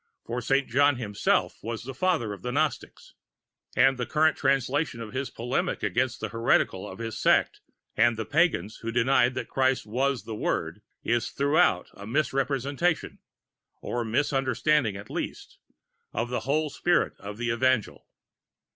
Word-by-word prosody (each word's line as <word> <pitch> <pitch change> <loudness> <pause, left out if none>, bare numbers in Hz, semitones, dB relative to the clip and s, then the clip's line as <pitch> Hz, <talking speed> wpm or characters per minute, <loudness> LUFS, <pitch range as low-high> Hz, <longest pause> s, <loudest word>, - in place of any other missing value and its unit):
For 120 +2 -3
Saint 135 +3 +1
John 145 +3 +3
himself 105 -5 0
was 115 0 -5
the 135 +2 -6
Father 140 - 0
of 100 - -10
the 125 - -3
Gnostics, 150 0 -2 0.6
and 135 0 +4
the 120 - -2
current 155 +3 +3
translation 135 0 0
of 115 -1 -7
his 135 +1 -2
polemic 125 +10 -2
against 125 -2 0
the - - -3
heretical 115 -4 +1
of 95 - -9
his 115 0 -5
Sect - - +2 0.3
and 115 0 +3
the 110 - -3
pagans 150 - +1
who 115 - -5
denied 125 +1 +3
that 130 - -3
Christ 130 -1 +1
was 130 +3 0
the 110 - -6
Word, 105 - -2 0.2
is 120 0 0
throughout 140 - +2
a 100 - -10
misrepresentation, 140 +4 0 0.6
or 120 0 -3
misunderstanding 135 0 +1
at 100 - -10
least, - - -6 0.5
of 115 +1 -2
the 125 - 0
whole 155 +1 +1
Spirit 175 +4 +1
of 100 +1 -8
that 120 - -5
Evangel. 130 -2 0
125 Hz, 155 wpm, -27 LUFS, 115-140 Hz, 0.6 s, and